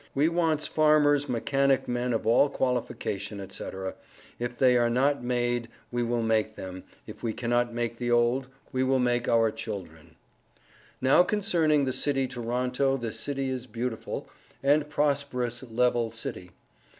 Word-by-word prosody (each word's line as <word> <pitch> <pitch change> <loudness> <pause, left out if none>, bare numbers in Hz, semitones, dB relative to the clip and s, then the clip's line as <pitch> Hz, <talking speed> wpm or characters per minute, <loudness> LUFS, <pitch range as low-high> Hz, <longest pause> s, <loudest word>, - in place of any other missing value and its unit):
We 145 +4 +3
wants 165 -3 +1
farmers 150 -2 +3
mechanic 135 +3 +1
men 125 0 -1
of 115 -2 -1
all 120 +5 +5
qualification 105 -6 -2
&c., - - -4 0.7
if 120 0 -4
they 125 -2 +5
are 120 -1 +3
not 135 +3 +1
made 120 -1 0 0.2
we 120 0 -1
will 120 0 0
make 110 -1 +1
them, 95 -1 -8 0.2
if - - -11
we 115 -2 -2
cannot 120 0 0
make 120 0 -3
the 120 0 -2
old, 120 +2 +2 0.2
we 130 0 0
will 130 0 +2
make 120 -1 +1
our 115 -1 +4
children. 95 -9 -7 0.9
Now 130 +6 +6
concerning 170 -8 +2
the 130 - -1
city 135 0 0
toronto 125 +2 -1
this 115 -4 -5
city 135 -2 -2
is 130 -1 -4
Beautiful 115 0 -4 0.4
and 145 +2 +3
Prosperous 140 -5 -1
Levele 120 -1 +1
city. 105 -5 -6
125 Hz, 150 wpm, -27 LUFS, 115-140 Hz, 0.9 s, Now